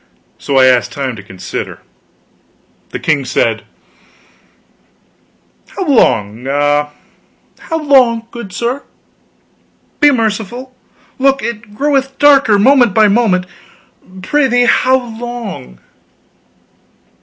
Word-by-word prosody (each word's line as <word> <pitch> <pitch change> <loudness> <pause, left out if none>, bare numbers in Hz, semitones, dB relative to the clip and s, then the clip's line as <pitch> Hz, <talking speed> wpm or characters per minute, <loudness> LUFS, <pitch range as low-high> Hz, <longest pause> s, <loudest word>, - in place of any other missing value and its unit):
So 140 - -2
I 130 - +6
asked 125 -2 +2
time 135 -3 -4
to 105 - -10
consider. 95 -2 -7 1.1
The - - -5
king 150 -3 0
said: 115 -3 -1 2.0
"How 380 - -5
long 115 - +1
ah, 145 +1 +1 0.7
how 325 -1 -4
long, 250 -5 +3
good 235 -5 -8
sir? 240 +8 -3 1.2
Be 295 - +6
merciful; 235 +1 -2 0.5
look, 270 0 +2
it 215 -2 -6
groweth 270 0 -1
darker, 275 -7 +5
moment 245 -1 +4
by 215 -1 +5
moment. 200 -4 +1 0.8
Prithee 250 0 +2
how 260 +1 +3 0.2
long?" 230 - -7
230 Hz, 100 wpm, -14 LUFS, -, 2.0 s, I